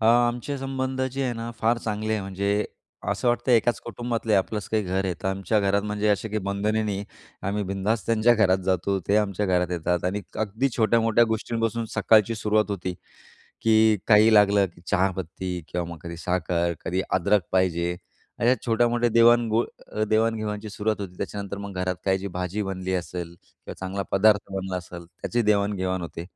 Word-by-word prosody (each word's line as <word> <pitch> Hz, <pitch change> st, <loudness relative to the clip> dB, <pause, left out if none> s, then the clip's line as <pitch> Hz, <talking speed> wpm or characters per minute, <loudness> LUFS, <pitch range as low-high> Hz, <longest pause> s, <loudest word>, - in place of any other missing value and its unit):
अ, 110 Hz, -, -1 dB
आमचे 120 Hz, +3 st, +2 dB
संबंध 130 Hz, 0 st, -3 dB
जे 135 Hz, -, -2 dB
आहे 125 Hz, -, 0 dB
ना 115 Hz, +1 st, -5 dB
फार 115 Hz, +1 st, +2 dB
चांगले 110 Hz, 0 st, -2 dB
आहे 110 Hz, -, 0 dB
म्हणजे, 100 Hz, +2 st, -1 dB, 0.4 s
असं 125 Hz, -, 0 dB
वाटतं 120 Hz, +1 st, +1 dB
एकाच 120 Hz, +1 st, +3 dB
कुटुंबातले 115 Hz, -1 st, -2 dB
आपलंच 100 Hz, +1 st, 0 dB
काही 110 Hz, -1 st, +1 dB
घर 95 Hz, +1 st, -1 dB
आहे. 90 Hz, -2 st, -1 dB
तर -, -, -2 dB
आमच्या 95 Hz, +2 st, 0 dB
घरात 100 Hz, +1 st, +2 dB
म्हणजे 105 Hz, 0 st, -1 dB
असे 105 Hz, +2 st, +1 dB
काही 110 Hz, +1 st, -1 dB
बंधने 105 Hz, +2 st, 0 dB
नाही. 100 Hz, -1 st, -2 dB, 0.4 s
आम्ही 100 Hz, +2 st, -1 dB
बिनधास्त 100 Hz, +4 st, -1 dB
त्यांच्या 115 Hz, +1 st, +4 dB
घरात 95 Hz, -4 st, +3 dB
जातो 95 Hz, +1 st, +1 dB
ते 100 Hz, -, +4 dB
आमच्या 105 Hz, -1 st, 0 dB
घरात 90 Hz, -1 st, +1 dB
येतात. 90 Hz, 0 st, -1 dB
आणि 100 Hz, +3 st, -1 dB, 0.2 s
अगदी 110 Hz, +7 st, -1 dB
छोट्या-मोठ्या 115 Hz, 0 st, +4 dB
गोष्टींपासून 115 Hz, +1 st, -1 dB
सकाळची 110 Hz, 0 st, +4 dB
सुरुवात 105 Hz, 0 st, +1 dB
होती, 90 Hz, -2 st, -3 dB, 0.7 s
की 110 Hz, -1 st, +4 dB
काही 110 Hz, 0 st, +6 dB
लागलं 100 Hz, -1 st, +5 dB
की 85 Hz, -, -17 dB
चहापत्ती 95 Hz, -2 st, -1 dB
किंवा 90 Hz, -1 st, -3 dB
मग 85 Hz, -, -7 dB
कधी 85 Hz, 0 st, -7 dB
साखर, 85 Hz, 0 st, 0 dB
कधी 95 Hz, +2 st, 0 dB
अदरक 100 Hz, +2 st, +2 dB
पाहिजे, 90 Hz, -2 st, +1 dB, 0.4 s
अशा 120 Hz, +2 st, +4 dB
छोट्या-मोठ्या 120 Hz, +1 st, +2 dB
देवाण 115 Hz, +1 st, +5 dB
घो 115 Hz, +2 st, +2 dB, 0.5 s
देवाण-घेवाणची 110 Hz, -1 st, 0 dB
सुरुवात 105 Hz, 0 st, -2 dB
होते. 90 Hz, -2 st, -7 dB
त्याच्यानंतर 100 Hz, -1 st, -5 dB
मग 100 Hz, -1 st, -7 dB
घरात 90 Hz, 0 st, -1 dB
काही 95 Hz, -1 st, +3 dB
जी 95 Hz, +1 st, -5 dB
भाजी 90 Hz, +3 st, -2 dB
बनली 95 Hz, 0 st, -3 dB
असेल 85 Hz, -1 st, -4 dB
किंवा -, -, -13 dB
चांगला 95 Hz, +1 st, -3 dB
पदार्थ 100 Hz, 0 st, +3 dB
बनला 95 Hz, -1 st, -3 dB
असेल 90 Hz, -1 st, -9 dB
त्याचीही 115 Hz, +7 st, -2 dB
देवाण-घेवाण 100 Hz, -3 st, +1 dB
होते. 85 Hz, 0 st, -6 dB
105 Hz, 175 wpm, -25 LUFS, 95-110 Hz, 0.7 s, काही